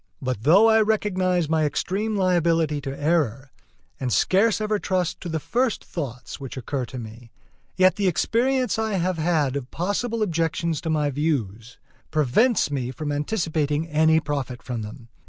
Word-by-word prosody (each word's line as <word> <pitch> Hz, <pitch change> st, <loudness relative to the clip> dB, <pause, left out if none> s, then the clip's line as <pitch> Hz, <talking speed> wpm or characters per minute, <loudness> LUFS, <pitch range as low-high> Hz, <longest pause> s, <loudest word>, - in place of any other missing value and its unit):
But 130 Hz, -5 st, -3 dB
though 185 Hz, -, +6 dB
I 220 Hz, 0 st, +5 dB
recognize 185 Hz, -5 st, +1 dB
my 160 Hz, 0 st, +1 dB
extreme 200 Hz, +8 st, -1 dB
liability 165 Hz, -5 st, +1 dB
to 135 Hz, 0 st, -6 dB
error, 145 Hz, -5 st, 0 dB, 0.5 s
and 130 Hz, -2 st, -2 dB
scarce 200 Hz, -, +3 dB
ever 215 Hz, -1 st, 0 dB
trust 185 Hz, -4 st, -1 dB
to 175 Hz, -, -5 dB
the 160 Hz, -1 st, -1 dB
first 240 Hz, -, -1 dB
thoughts 125 Hz, -7 st, -6 dB
which 135 Hz, -1 st, -7 dB
occur 130 Hz, +1 st, -3 dB
to 130 Hz, -, -8 dB
me, 115 Hz, 0 st, -9 dB, 0.5 s
yet 185 Hz, 0 st, +4 dB
the 200 Hz, -2 st, +1 dB
experience 245 Hz, +7 st, +1 dB
I 220 Hz, -1 st, -1 dB
have 180 Hz, -2 st, 0 dB
had 155 Hz, -5 st, +1 dB
of 135 Hz, -3 st, -4 dB
possible 215 Hz, +5 st, -1 dB
objections 165 Hz, -3 st, -1 dB
to 165 Hz, -, -4 dB
my 150 Hz, -2 st, +1 dB
views 125 Hz, -7 st, -2 dB, 0.3 s
prevents 155 Hz, -, +2 dB
me 130 Hz, -3 st, -2 dB
from 145 Hz, +3 st, -4 dB
anticipating 155 Hz, -1 st, -1 dB
any 160 Hz, +1 st, +4 dB
profit 140 Hz, -5 st, -4 dB
from 120 Hz, -3 st, -4 dB
them. 110 Hz, +2 st, -9 dB
160 Hz, 160 wpm, -24 LUFS, 135-185 Hz, 0.5 s, though